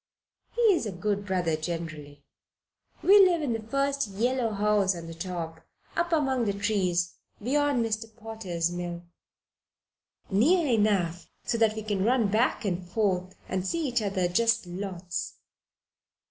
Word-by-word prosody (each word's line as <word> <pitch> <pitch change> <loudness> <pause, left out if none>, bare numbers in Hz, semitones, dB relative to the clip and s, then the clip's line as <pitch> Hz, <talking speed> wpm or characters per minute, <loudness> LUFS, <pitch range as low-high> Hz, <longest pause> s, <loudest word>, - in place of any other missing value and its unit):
He 480 - -1
is 325 -10 -1
a - - -3
good 205 +2 -2
brother 180 -4 +1
generally. 155 -3 -6 0.8
We 405 +2 +8
live 345 -4 +3
in 255 -5 0
the 225 - -3
first 275 +3 0
yellow 235 +4 0
house 205 -2 +2
on 170 -1 -7
the 165 - -7 0.2
right 165 -2 -5 0.3
up 345 0 0
among 265 -6 +2
the 200 - 0
trees 185 -4 0 0.2
beyond 275 +1 +1
Mr. 220 0 -2
Potter's 200 -7 -3
mill 175 -1 -5 1.3
near 310 - +4
enough 205 - +1 0.2
so 230 - -1
that 220 -1 +3
we 220 - -4
can 205 -3 -1
run 230 -1 +3
back 220 +2 +1
and 180 -2 -1
forth 185 -1 -1
and 185 0 -2
see 330 - -1
each 245 -2 +1
other 195 -3 0
just 230 +4 +2
lots." 180 -1 -5
205 Hz, 145 wpm, -28 LUFS, 180-235 Hz, 1.3 s, We